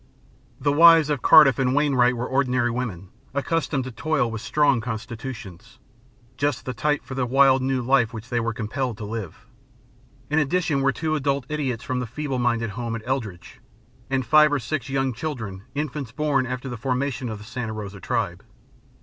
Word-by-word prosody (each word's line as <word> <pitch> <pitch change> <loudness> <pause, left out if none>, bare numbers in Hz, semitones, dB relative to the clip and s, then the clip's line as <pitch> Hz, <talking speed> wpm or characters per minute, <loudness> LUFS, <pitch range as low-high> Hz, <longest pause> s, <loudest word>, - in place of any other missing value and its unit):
"The 145 -1 +1
wives 165 -1 +7
of 145 -4 -1
Cardiff 150 -6 +7
and 130 0 +1
Wainwright 130 -4 +3
were 120 - -2
ordinary 130 -3 +1
women, 105 -7 -4 0.3
accustomed 145 -1 -1
to 130 - -6
toil 135 -1 0
with 110 -1 -5
strong 140 -1 +2
constitutions 115 -4 -7 0.6
just 145 -1 -1
the 130 - -3
type 150 +4 0
for - - -8
the 130 -1 -1
wild 135 +1 +5
new 130 -1 0
life 125 -2 +3
which 110 -1 -8
they 120 - 0
were 115 0 -1
compelled 115 +2 -3
to 105 - -6
live. 105 -5 -6 0.9
In 155 - +3
addition 155 -1 +1
were 135 0 +3
two 155 +3 -2
adult 140 -3 0
idiots 135 -6 -2
from 130 -2 -2
the 125 - -3
feeble 135 +2 -3
minded 115 -2 0
home 115 +1 -4
at 110 - -7
Eldredge, 110 -10 -4 0.5
and 130 -1 0
five 150 +4 +6
or 145 - +2
six 140 +2 -4
young 135 -1 0
children 115 -8 -5 0.2
and 145 - +1
infants 140 -4 -6
born 135 -1 0
after 125 +1 -4
the 125 -2 -5
formation 130 0 -2
of 110 - -5
the 105 - -11
Santa 120 -1 -5
Rosa 100 -2 -7
Tribe. - - -2
130 Hz, 185 wpm, -24 LUFS, 115-140 Hz, 0.9 s, wives